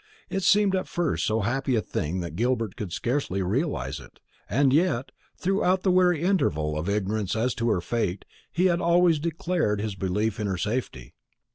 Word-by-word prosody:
It 195 - -1
seemed 200 0 +4
at 185 - -2
first 175 -3 -1
so 110 +1 +1
happy 130 +5 0
a - - +3
thing 90 +5 -2
that 85 -2 -6
Gilbert 115 -1 0
could 100 -5 -5
scarcely 115 - -1
realise 95 - -1
it; 65 -3 -16 0.3
and 135 +3 +3
yet, 150 -5 +1 0.3
throughout 190 0 +1
the 190 - +3
weary 180 -3 +3
interval 80 - +1
of 80 +5 -2
ignorance 105 0 -1
as 120 +3 +1
to 115 0 -1
her 95 -5 +1
fate, 100 -3 -2 0.3
he 180 +3 +1
had 175 -1 +2
always 170 -1 +4
declared 165 - -1
his 105 0 -2
belief 95 +4 -1
in 105 - -1
her 95 -2 -1
safety. 100 - -3
115 Hz, 180 wpm, -26 LUFS, -, 0.3 s, seemed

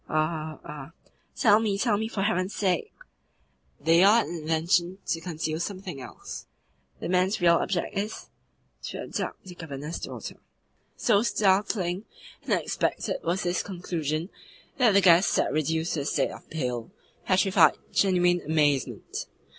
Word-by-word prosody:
"Are, 155 0 -1
are 150 +1 -9 0.2
" - - -41
"Tell 215 -3 +5
me, 210 -3 0
tell 215 0 +2
me, 220 +2 -1
for 205 -3 -2
heaven's 195 -1 0
sake!" 185 -4 0 0.9
"They 165 +3 +4
are 215 +4 +6
an 170 - -6
invention 170 +3 0
to 165 - -1
conceal 160 -2 -3
something 185 -5 -5
else. 125 - -9 0.5
The - - -4
man's 185 +3 +2
real 170 -2 +5
object 190 +3 -2
is, 205 +2 -1
is - - -11 0.5
TO - - -6
ABDUCT - - -4
THE 180 - -9
GOVERNOR'S 150 -2 -6
DAUGHTER." - - -7 0.6
So 210 -4 +3
startling 195 -3 +1 0.4
and - - -1
unexpected - - -1
was 175 +3 0
this 175 0 0
conclusion 170 -3 -3 0.5
that 240 -5 +4
the 200 - +6
guest 180 0 +6
sat - - +1
reduced 160 +2 0
to 155 - -1
a 140 - -3
state - - 0
of - - -12
pale, 125 -6 -3 0.4
petrified, 190 0 +4 0.2
genuine 180 -2 +3
amazement. 150 -4 0
175 Hz, 150 wpm, -27 LUFS, 160-195 Hz, 0.9 s, are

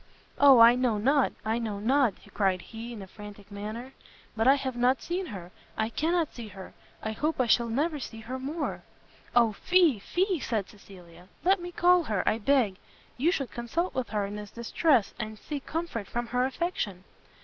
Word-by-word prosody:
"O 280 -2 +8
I 230 +1 +9
know 245 -3 +1
not! 270 +6 +3
I 220 +2 0
know 220 -3 -3
not!" 250 +1 +2 0.2
cried 190 -3 +1
he, 230 +2 -8
in 215 -4 -7
a - - -11
frantic 205 0 -12
manner, 215 +6 -6 0.4
"but 225 +2 +1
I 270 - +8
have 265 -2 -3
not 250 +2 +2
seen 360 +2 -3
her, 185 - -8 0.3
I 220 0 0
cannot 325 +5 0
see 235 -3 -8
her, 190 -2 -11 0.3
I 220 - -2
hope 300 +7 -2
I 255 - +3
shall 235 +1 +3
never 295 +6 0
see 225 -3 -7
her 255 +4 -5
more! 290 +4 -3 0.3
" - - -26
"O 235 -2 +5
fie! 340 - +3
fie!" 365 - 0
said 220 -7 -2
Cecilia, 180 -3 -15 0.2
"let 375 +1 +3
me 350 0 -6
call 355 -1 +4
her, 210 -7 -1
I 220 - +2
beg; 230 -5 +2 0.4
you 305 +8 +2
should 275 -8 -2
consult 280 +10 -2
with 255 -2 -2
her 205 -1 -1
in 205 +1 -6
this 210 -1 -7
distress, 235 +1 +1
and 215 0 -5
seek 285 +4 -6
comfort 315 - -3
from 240 0 -3
her 250 +2 0
affection." 260 - -3
240 Hz, 195 wpm, -28 LUFS, 210-285 Hz, 0.4 s, I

